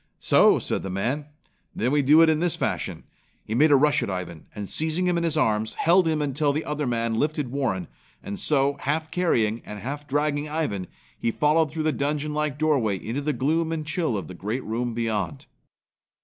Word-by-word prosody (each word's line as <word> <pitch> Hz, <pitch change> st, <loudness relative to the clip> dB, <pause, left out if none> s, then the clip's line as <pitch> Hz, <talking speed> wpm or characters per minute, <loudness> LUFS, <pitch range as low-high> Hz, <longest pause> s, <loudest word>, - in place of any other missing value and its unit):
"So!" -, -, +5 dB
said -, -, -2 dB
the 95 Hz, -, -5 dB
man. 125 Hz, +11 st, -2 dB, 0.5 s
"Then 120 Hz, +3 st, 0 dB
we 145 Hz, 0 st, +3 dB
do 150 Hz, +4 st, +6 dB
it 165 Hz, -, +5 dB
in 155 Hz, -, +1 dB
this 175 Hz, 0 st, +1 dB
fashion." -, -, -3 dB, 0.4 s
He 110 Hz, -, -4 dB
made 150 Hz, +7 st, +5 dB
a -, -, +8 dB
rush 145 Hz, +2 st, +3 dB
at -, -, -2 dB
Ivan 90 Hz, -4 st, -5 dB
and 105 Hz, -2 st, -5 dB
seizing 160 Hz, -, 0 dB
him 180 Hz, -1 st, +2 dB
in 170 Hz, -, 0 dB
his 160 Hz, -2 st, 0 dB
arms, 110 Hz, -5 st, +1 dB
held 175 Hz, +1 st, +4 dB
him 155 Hz, -2 st, +1 dB
until 145 Hz, +1 st, +1 dB
the 155 Hz, +3 st, -2 dB
other 150 Hz, -2 st, -2 dB
man 115 Hz, -1 st, 0 dB
lifted 150 Hz, -4 st, -1 dB
Warren 110 Hz, -, -1 dB, 0.4 s
and 100 Hz, 0 st, -5 dB
so, 140 Hz, -1 st, +2 dB
half 155 Hz, +3 st, -2 dB
carrying 115 Hz, -11 st, +1 dB
and 105 Hz, -, -8 dB
half 140 Hz, +8 st, -6 dB
dragging 145 Hz, +1 st, 0 dB
Ivan, 110 Hz, -, -2 dB, 0.3 s
he -, -, 0 dB
followed 150 Hz, +5 st, +2 dB
through 155 Hz, +2 st, -3 dB
the 155 Hz, -, +2 dB
dungeon 150 Hz, +1 st, -2 dB
like 150 Hz, -2 st, -1 dB
doorway 140 Hz, -10 st, +1 dB
into 115 Hz, +9 st, -4 dB
the 150 Hz, +1 st, 0 dB
gloom 155 Hz, +5 st, 0 dB
and 160 Hz, -2 st, -3 dB
chill 160 Hz, -, -1 dB
of 90 Hz, -6 st, -5 dB
the -, -, -8 dB
great 105 Hz, +8 st, -4 dB
room 115 Hz, +1 st, -2 dB
beyond. 105 Hz, -, -2 dB
145 Hz, 205 wpm, -25 LUFS, 115-155 Hz, 0.5 s, a